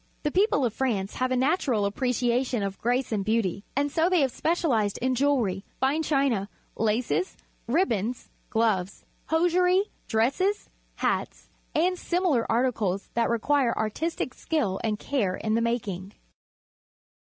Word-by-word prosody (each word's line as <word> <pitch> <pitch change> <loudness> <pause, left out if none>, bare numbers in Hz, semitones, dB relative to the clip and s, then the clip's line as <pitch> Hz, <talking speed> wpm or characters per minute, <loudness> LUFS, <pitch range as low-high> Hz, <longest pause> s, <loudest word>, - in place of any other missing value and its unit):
The 295 - 0
people 370 - +3
of 230 - -1
"France 215 -8 -1
have 255 0 +1
a 255 - +1
natural 260 - +1
appre 210 +6 -1
ciation 245 -2 +1
of 195 0 -5
grace 245 +2 0
and 205 -3 0
beauty, 205 -3 0
and 285 +1 +1
so 325 +4 +2
they 365 -4 +3
have 270 -2 +2
specialized 245 - 0
in 255 +1 0
jewellery, 245 -8 +1 0.2
fine 275 +5 +2
china, 270 -10 +1 0.3
l 225 - +2
aces, 245 - -1 0.3
ribbons, 240 - 0 0.2
gloves, 210 -4 0 0.2
hosiery, 360 +4 +3 0.2
dresse 230 +9 +1
s, 405 +2 0 0.3
hata, - - -1 0.4
and 360 +3 +2
similar 345 -9 +1
articles 225 -5 0
that 235 0 +1
require 240 +1 +1
artistic 255 +5 -2
skill 220 - -1
and 215 -2 0
care 210 -8 -1
in 215 - -2
the 230 - +2
making. 210 -5 -2
245 Hz, 145 wpm, -26 LUFS, 215-295 Hz, 0.4 s, people